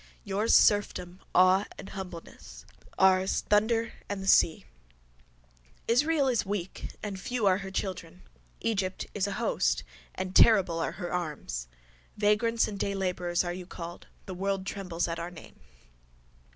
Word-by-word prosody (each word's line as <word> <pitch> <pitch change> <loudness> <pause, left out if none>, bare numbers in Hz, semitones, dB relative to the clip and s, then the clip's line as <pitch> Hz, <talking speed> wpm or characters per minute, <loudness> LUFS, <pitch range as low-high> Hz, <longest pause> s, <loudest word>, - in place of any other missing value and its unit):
Yours 205 +3 +2
serfdom, 185 -3 +3 0.2
awe 185 +2 +5
and - - -9
humbleness: 180 -3 -9 0.3
ours 190 0 +4
thunder 225 +2 +1 0.2
and 200 -1 -3
the - - -6
seas. 160 -4 +4 1.2
Israel 285 +4 +3
is 245 -4 +2
weak 195 -2 -4 0.2
and 200 -3 -4
few 245 +2 -2
are 190 -1 +4
her 195 -1 -6
children: 190 - -5 0.4
Egypt 195 -4 -1
is 205 -1 0
an 200 - -3
host - - 0 0.3
and 185 0 -4
terrible 190 -7 +5
are 165 - -2
her 175 - -5
arms. 150 - -4 0.5
Vagrants 215 +2 +2
and 200 -2 -6
daylabourers 180 -3 -1
are 175 - -2
you 180 0 -8
called: 170 -1 -8 0.2
the 190 - -6
world 195 +1 -2
trembles 185 -4 -3
at 165 0 -3
our 170 +1 -4
name. 175 -3 -14
190 Hz, 140 wpm, -29 LUFS, 180-205 Hz, 1.2 s, awe